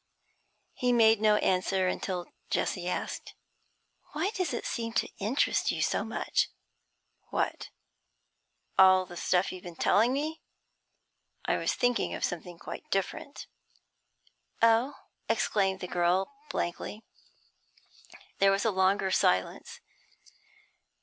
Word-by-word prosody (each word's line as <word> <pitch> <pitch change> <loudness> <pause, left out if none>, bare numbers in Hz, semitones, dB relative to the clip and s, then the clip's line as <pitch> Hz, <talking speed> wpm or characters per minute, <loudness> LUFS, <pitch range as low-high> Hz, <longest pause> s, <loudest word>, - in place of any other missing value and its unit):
He 250 -1 0
made 225 -2 +5
no 215 -1 +5
answer, 185 -1 +1
until 185 -1 -2 0.2
Jessie 175 -1 -1
asked - - -4 0.8
'Why 325 +7 0
does 370 -6 -2
it 240 - -4
seem 230 -1 -3
to - - +1
interest 220 +8 +1
you - - 0
so - - 0
much?' - - 0 0.8
'What? - - -2 1.1
all 185 -1 +7
that 175 -1 -10
stuff 180 +2 +1
you've 185 - -8
been 175 -2 -9
telling 225 +8 +3
me? 300 +4 -2 1.0
I - - +1
was - - 0
thinking 245 -1 +1
of - - -6
something 175 0 -6
quite - - -9
different.' 195 +8 -3 1.1
'Oh!' 230 +4 +4 0.3
exclaimed 195 -2 +1
the 180 - -4
girl, 180 +7 +1 0.2
blankly. 210 +5 -4 1.4
There 195 - +6
was 195 +2 0
a 225 - +3
longer 190 0 +2
silence. 95 - 0
195 Hz, 115 wpm, -29 LUFS, 185-235 Hz, 1.4 s, all